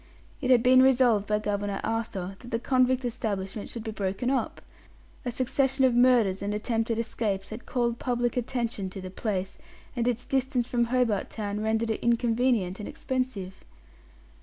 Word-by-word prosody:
It 255 - -1
had 245 -2 +6
been 255 0 +7
resolved 250 -6 +4
by 210 - +2
Governor 205 -1 -2
Arthur 200 -5 -3
that 245 - -11
the 230 - 0
convict 255 +1 +2
establishment 210 -4 -3
should 230 - -6
be 220 - -4
broken 205 +4 -2
up. 270 - -1 0.7
A - - 0
succession 265 +2 +1
of 255 - +3
murders 240 -6 +4
and 205 +1 -2
attempted 225 +1 -1
escapes 215 -4 -2
had 220 +3 -8
called 235 -2 0
public 240 -2 0
attention 235 -5 -2
to 195 - -8
the 185 -1 -7
place, 190 -1 -3 0.4
and 240 -1 0
its 245 0 -1
distance 265 -2 0
from 240 -1 +1
Hobart 235 -4 +1
Town 210 -1 -4
rendered 220 +1 0
it 220 - -3
inconvenient 235 -4 +1
and 210 - -5
expensive. 255 -8 -4
230 Hz, 165 wpm, -27 LUFS, 205-250 Hz, 0.7 s, been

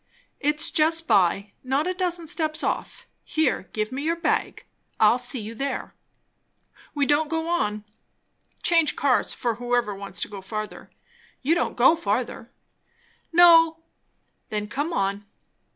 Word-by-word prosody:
"It's 300 +1 +1
just 325 +1 +2
by; 195 +2 +2
not 270 +4 0
a 365 - -1
dozen 350 -2 -1
steps 310 0 -3
off. - - -3 0.2
Here, 315 - -1
give 215 +1 -2
me 265 +2 -4
your 325 +3 0
bag 335 - -1 0.3
I'll 220 +3 +5
see 250 +1 -2
you 220 +1 -7
there. 275 +5 -4 1.0
We 285 -1 +2
don't 295 +2 +2
go 325 0 -2
on; 215 -12 -1 0.8
change 330 -3 +3
cars, 270 -3 +1
for 235 -2 -1
whoever 245 -3 0
wants 195 -2 -7
to - - -4
go 200 -2 -9
further. 215 +2 -6 0.5
You 300 +5 +3
don't 345 - -1
go 265 +7 +6
further?" 230 -2 -3 0.8
"No." 330 -1 +7 0.7
"Then 210 -1 -3
come 290 +9 -3
on." 200 -6 -1
275 Hz, 140 wpm, -24 LUFS, 215-325 Hz, 1.0 s, No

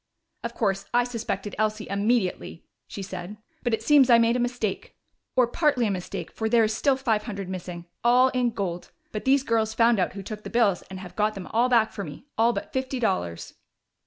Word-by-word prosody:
"Of 235 0 -5
course, 195 -3 0
I 245 - +5
suspected 230 -4 -4
Elsie 215 0 0
immediately," 200 -4 -1 0.2
she 200 - -6
said, 185 +2 -7 0.2
"but 240 - -1
it 225 - -1
seems 285 -4 +5
I 235 - +8
made 230 +1 +3
a - - 0
mistake. 245 -4 -2 0.4
Or 255 -1 +5
partly 255 0 +1
a 210 - +1
mistake, 185 -2 -5
for 220 0 -2
there 230 0 +5
is 215 0 +1
still 270 +5 +2
five 225 -5 0
hundred 200 -4 -5
missing 180 -2 -6 0.2
all 250 +2 +5
in 250 -1 +1
gold. 190 -6 -4 0.2
But 215 - -5
these 270 0 +4
girls 225 -3 0
found 230 -2 +4
out 180 - 0
who 195 0 -7
took 210 +2 -7
the - - -6
bills 220 -6 +2
and 190 0 -7
have 180 -2 -10
got 215 0 +1
them 190 -2 -6
all 240 +3 +3
back 230 -3 +4
for 205 -2 -5
me 150 - -9
all 230 +2 +4
but - - -6
fifty 260 0 -2
dollars." 185 - -2
220 Hz, 215 wpm, -26 LUFS, 195-245 Hz, 0.4 s, I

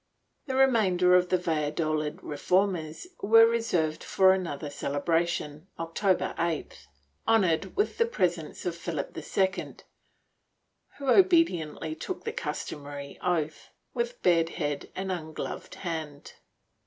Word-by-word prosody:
^ - - -42
The 260 - -2
remainder 205 -9 +4
of 180 0 +3
the 185 - +3
\'alladolid 155 -2 -1
reformers 170 - 0 0.2
were 225 +2 +7
reserved 220 -10 0
for 190 -1 +5
another 155 -6 -3
celebration, 155 +2 -1
October 165 +3 0
8th, 165 -2 -3 0.4
honored 195 -4 +2
with 415 +4 0
the 465 - +4
presence 175 - -2
of 175 -2 -1
Philip 165 -4 -4
II, 190 0 -1 1.2
who 280 - -6
obediently 290 - +3
took 340 - -6
the 450 - -3
customary 145 - -6
oath, 160 -4 -1 0.2
with 485 +1 -2
bared 165 -2 +4
head 145 -4 -2
and 190 0 -3
ungloved 160 -3 -5
hand. 160 -5 -6
175 Hz, 115 wpm, -28 LUFS, 155-200 Hz, 1.2 s, were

